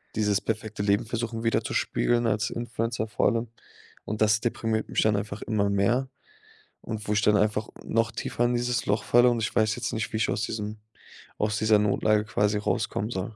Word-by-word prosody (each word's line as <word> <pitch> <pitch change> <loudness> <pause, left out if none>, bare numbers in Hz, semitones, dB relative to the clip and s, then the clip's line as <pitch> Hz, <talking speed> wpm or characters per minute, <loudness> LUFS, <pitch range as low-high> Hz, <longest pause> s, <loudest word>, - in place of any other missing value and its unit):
dieses 105 -2 +1
perfekte 110 -2 -3
Leben 100 +2 +2
versuchen 115 0 -3
widerzuspiegeln 120 +1 +1
als 110 +1 0
Influencer 115 -1 -3
vor 105 - +1
allem 115 +1 0 0.6
und 105 +1 -4
das 110 +1 +4
deprimiert 115 -1 -1
mich - - +1
dann 110 -1 +3
einfach 100 0 -4
immer 105 -3 0
mehr 115 +7 +1 0.7
und 110 -2 -6
wo 105 - +1
ich 105 - +2
dann 105 0 +4
einfach 105 +1 0 0.2
noch 115 0 +1
tiefer 120 +1 -1
in 120 - +1
dieses 120 0 0
Loch 105 +2 +1
falle 120 +1 +5
und 120 - 0
ich 110 - -2
weiß 110 -1 +3
jetzt 125 - -3
nicht, 110 0 -2
wie 110 - 0
ich 110 - +1
aus - - -1
diesem 105 0 -4 0.6
aus 105 0 0
dieser 110 -1 +4
Notlage 105 +1 +2
quasi 105 -1 +1
rauskommen 105 +1 -1
soll. 100 +1 -4
110 Hz, 195 wpm, -26 LUFS, 105-115 Hz, 0.7 s, falle